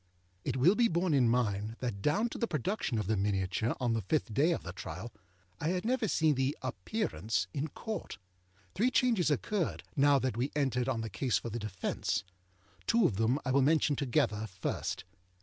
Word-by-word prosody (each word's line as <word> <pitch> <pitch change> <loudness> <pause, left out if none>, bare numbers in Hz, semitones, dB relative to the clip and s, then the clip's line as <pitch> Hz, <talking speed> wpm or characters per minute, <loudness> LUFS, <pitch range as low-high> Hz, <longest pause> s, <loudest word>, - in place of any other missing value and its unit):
It - - -1
will 155 +9 +6
be 235 +2 +4
borne 170 -2 +1
in 130 -4 +4
mind 110 -2 0
that 120 -6 -3
down 185 - +2
to - - -7
the 235 - +1
production 155 - -1
of 105 - -1
the 110 +3 +1
miniature, 100 +2 0
on 120 -3 +1
the 115 - 0
fifth 115 - -1
day 145 +9 +3
of 170 - -1
the 85 - -6
trial, 95 +5 -7 0.5
I 150 - -1
had 180 +3 0
never 250 -1 +1
seen 160 -4 +3
the 135 +1 0
Appearance 115 - -1
in 145 +3 -1
Court. 220 +8 -6 0.6
Three 230 +7 +2
changes 235 - +3
occurred 175 +4 -1
now 140 0 +5
that 130 -4 -1
we 130 +4 0
entered 130 -3 +1
on 115 -4 0
the 110 - -4
case 120 +4 +1
for 115 - -5
the 120 - -3
defence. 100 -2 -2 0.6
Two 230 0 +4
of 95 - +1
them 115 +4 +2
I 130 - 0
will 140 +1 +4
mention 150 +1 +3
together, 110 -5 0
first. 95 -2 -3
130 Hz, 195 wpm, -32 LUFS, 110-160 Hz, 0.6 s, will